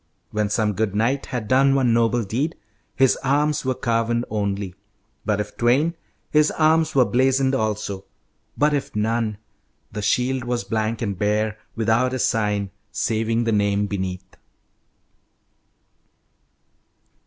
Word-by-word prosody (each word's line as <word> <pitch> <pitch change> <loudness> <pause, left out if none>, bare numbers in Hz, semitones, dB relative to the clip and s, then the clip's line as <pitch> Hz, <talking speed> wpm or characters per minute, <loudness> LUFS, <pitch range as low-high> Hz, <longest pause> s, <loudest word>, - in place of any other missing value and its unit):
When 105 -1 0
some 105 0 +1
good 105 0 -1
knight 125 +6 0
had 120 -5 -4
done 135 +2 +4
one 125 -4 +3
noble 115 0 +2
deed 130 - -2 0.4
His 135 -1 +4
arms 145 +2 +1
were 130 -1 0
carven 115 0 0
only, 100 -3 -2 0.5
but 105 -1 +1
if 105 - -4
twain 135 +8 +2 0.4
His 150 0 +4
arms 160 0 +2
were 130 -2 +6
blazoned 130 +2 +2
also, 105 -5 -2 0.5
but 150 +1 +3
if 140 -6 -2
none 110 0 0 0.5
The 105 - -4
shield 125 +5 +1
was 120 -1 -2
blank 110 0 -2
and 100 -3 -2
bare, 105 +1 0 0.2
without 115 +3 +1
a - - -1
sign, 105 -5 0 0.2
Saving 115 +1 0
the 115 - 0
name 100 -1 +2
beneath." 95 -2 -5
115 Hz, 130 wpm, -22 LUFS, 105-130 Hz, 0.5 s, were